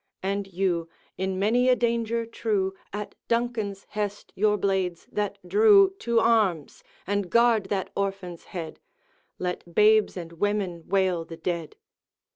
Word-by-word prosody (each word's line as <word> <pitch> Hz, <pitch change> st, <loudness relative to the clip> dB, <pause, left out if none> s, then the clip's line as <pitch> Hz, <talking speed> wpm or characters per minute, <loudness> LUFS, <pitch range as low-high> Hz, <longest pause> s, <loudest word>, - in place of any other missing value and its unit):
And 200 Hz, +1 st, -1 dB
you, 175 Hz, -3 st, -1 dB, 0.3 s
in 190 Hz, 0 st, -2 dB
many 235 Hz, +6 st, +3 dB
a 250 Hz, -, +6 dB
danger 235 Hz, -1 st, 0 dB
true 210 Hz, -4 st, -1 dB, 0.2 s
At 205 Hz, +1 st, -5 dB
Duncan's 230 Hz, -4 st, -1 dB
hest 205 Hz, -1 st, -4 dB
your 210 Hz, +1 st, +2 dB
blades 190 Hz, -3 st, -1 dB
that 205 Hz, -1 st, -2 dB
drew, 405 Hz, -2 st, +6 dB
To 235 Hz, -1 st, +2 dB
arms, 215 Hz, -10 st, +1 dB, 0.2 s
and 200 Hz, -1 st, -1 dB
guard 235 Hz, -1 st, +4 dB
that 190 Hz, -1 st, -2 dB
orphan's 195 Hz, -3 st, -3 dB
head! 165 Hz, -5 st, -7 dB, 0.6 s
Let 180 Hz, -1 st, -5 dB
babes 215 Hz, -1 st, +4 dB
and 170 Hz, -2 st, -6 dB
women 185 Hz, -2 st, -2 dB
wail 185 Hz, -3 st, +1 dB
the 165 Hz, 0 st, -10 dB
dead.' 170 Hz, -1 st, -3 dB
200 Hz, 135 wpm, -26 LUFS, 180-225 Hz, 0.6 s, a